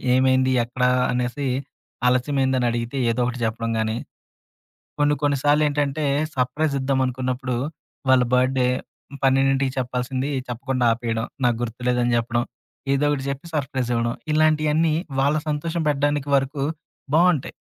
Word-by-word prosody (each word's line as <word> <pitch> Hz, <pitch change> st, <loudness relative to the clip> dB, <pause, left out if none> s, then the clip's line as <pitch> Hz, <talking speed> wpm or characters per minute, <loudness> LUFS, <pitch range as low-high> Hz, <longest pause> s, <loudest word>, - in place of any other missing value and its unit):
ఏమైంది, 130 Hz, 0 st, +3 dB
ఎక్కడ 125 Hz, +1 st, -4 dB, 0.3 s
అనేసి 125 Hz, +3 st, -1 dB, 0.6 s
ఆలస్యమైంది 130 Hz, +1 st, +1 dB
అని 120 Hz, -, +1 dB
అడిగితే 120 Hz, +3 st, -3 dB
ఏదో 125 Hz, +2 st, -1 dB
ఒకటి 125 Hz, 0 st, -4 dB
చెప్పడం 115 Hz, +1 st, -2 dB
గానీ, 110 Hz, +1 st, -1 dB, 1.0 s
కొన్ని, 145 Hz, 0 st, +4 dB
కొన్ని 145 Hz, -1 st, +2 dB
సార్లు 150 Hz, +1 st, +4 dB
ఏంటంటే 145 Hz, +1 st, -1 dB, 0.3 s
సర్‌ప్రై‌జ్ 140 Hz, +3 st, 0 dB
ఇద్దాం 130 Hz, 0 st, 0 dB
అనుకున్నప్పుడు, 125 Hz, 0 st, -2 dB, 0.5 s
వాళ్ళ 130 Hz, -1 st, +6 dB
బర్డ్‌ 130 Hz, +1 st, +3 dB
డే 125 Hz, -, +3 dB, 0.6 s
12కి 135 Hz, 0 st, +3 dB
చెప్పాల్సింది 130 Hz, +2 st, -2 dB, 0.2 s
చెప్పకుండా 125 Hz, +1 st, -2 dB
ఆపేయడం. 115 Hz, -1 st, -2 dB, 0.2 s
నాకు 120 Hz, -2 st, +2 dB
గుర్తులేదని 120 Hz, +1 st, 0 dB
చెప్పడం. 120 Hz, +1 st, -1 dB, 0.5 s
ఏదోకటి 145 Hz, -1 st, +1 dB
చెప్పి 140 Hz, +5 st, -6 dB
సర్‌ప్రైజ్ 130 Hz, -4 st, -2 dB
ఇవ్వడం. 115 Hz, 0 st, 0 dB, 0.2 s
ఇలాంటియన్నీ 155 Hz, 0 st, +3 dB, 0.3 s
వాళ్ళ 145 Hz, +3 st, +2 dB
సంతోషం 160 Hz, +3 st, -2 dB
పెట్టడానికి 145 Hz, 0 st, 0 dB
వరకు 135 Hz, +1 st, -1 dB, 0.5 s
బావుంటాయి. 170 Hz, -4 st, +3 dB
130 Hz, 125 wpm, -23 LUFS, 125-145 Hz, 1.0 s, వాళ్ళ